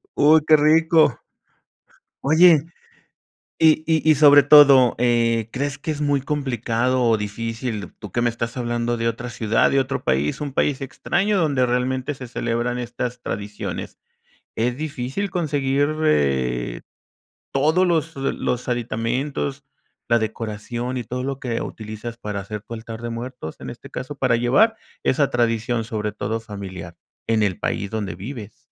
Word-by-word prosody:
Uy, 155 +2 +6
qué 155 - +8
rico. 155 -2 +4 1.0
Oye, 160 +1 +6 0.9
y 155 -1 +5
y 160 -1 +1
y - - +7
sobre 145 -1 +7
todo, 140 -4 +7
eh, 115 -2 +2
¿crees 140 +1 -2
que 145 +3 -5
es 150 -1 -3
muy 145 -1 +1
complicado 130 -3 -1
o 115 -2 +3
difícil? 110 0 -4
¿Tú 105 -4 -10
qué 120 - 0
me 120 0 +2
estás 115 +1 -5
hablando 120 -1 -1
de 115 0 0
otra 120 +2 -4
ciudad, 110 -2 +1
de 135 - +4
otro 135 +1 -3
país, 70 +3 0
un 145 -2 -4
país 135 +1 0
extraño 195 +9 -1
donde 140 -7 +2
realmente 130 +3 -1
se 130 -2 -9
celebran 120 +1 -2
estas 125 0 -4
tradiciones? 100 +1 -5 0.6
¿Es 120 +2 -1
difícil 150 +5 -4
conseguir, 145 -4 0 0.2
eh, 65 - 0 0.7
todos 160 +7 +3
los 165 -1 0
los 130 -2 -2
aditamentos, 125 +4 -2 0.5
la 120 0 +4
decoración 115 +3 -4
y 120 - -4
todo 125 +3 -4
lo 135 0 -3
que 120 -3 -3
utilizas 110 +2 -7
para 105 -3 -4
hacer 105 +1 -6
tu 115 - -9
altar 115 0 -8
de 120 - -4
muertos, 120 -8 -6
en - - -6
este - - -10
caso, 130 +3 -6
para 130 -3 +2
llevar 130 - +3 0.3
esa 140 +1 +2
tradición, 115 -1 0
sobre 105 -1 -3
todo 110 +2 -3
familiar, 95 -6 -8 0.3
en 110 -1 +2
el 95 -3 0
país 100 - -2
donde 105 -5 -4
vives? 110 +2 -8
120 Hz, 150 wpm, -22 LUFS, 115-140 Hz, 1.0 s, qué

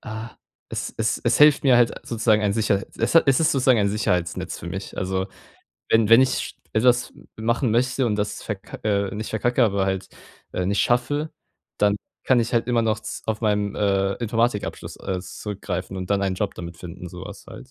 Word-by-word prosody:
ah 110 +1 -6 0.4
es - - -4
es - - +1
es - - +3
hilft 150 0 +6
mir 130 -3 +6
halt 120 -1 +4
sozusagen 110 -2 +2
ein 105 -1 +2
Sicherheit 105 -2 0
es - - 0
ha 165 - +8
es 135 +1 +4
ist 160 +1 +3
sozusagen 130 -3 +4
ein 100 - +2
Sicherheitsnetz 90 -5 -1
für - - -8
mich. - - -6
Also, 95 0 -1 0.6
wenn 115 -2 +4
wenn 115 +2 +9
ich 130 - -1 0.2
etwas 125 +2 +3 0.2
machen 115 +2 0
möchte 125 +2 +1
und 105 - +1
das 105 0 -3
verk 100 -3 -6
äh, 100 -2 +1
nicht 110 +1 -5
verkacke, 120 +3 +2
aber 100 -3 +1
halt, 95 -1 -2 0.4
äh, 90 - -1
nicht 100 +2 +1
schaffe, 145 +6 +1 0.5
dann 105 0 +3 0.3
kann 130 -2 +4
ich 115 +1 -2
halt 115 - +2
immer 120 -1 +2
noch 110 -1 0
z - - -7
auf 110 -1 -1
meinen, 105 -2 +1
äh, 100 -1 +1
Informatikabschluss, 115 -1 -2
äh, 95 -2 -3
zurückgreifen 95 -1 -5
und 95 0 -5
dann 100 -1 +2
einen 95 -1 0
Job 100 +1 -2
damit 85 -1 -8
finden, 90 +1 -8
sowas 95 +3 -10
halt. 130 - -11
105 Hz, 195 wpm, -23 LUFS, 100-120 Hz, 0.6 s, wenn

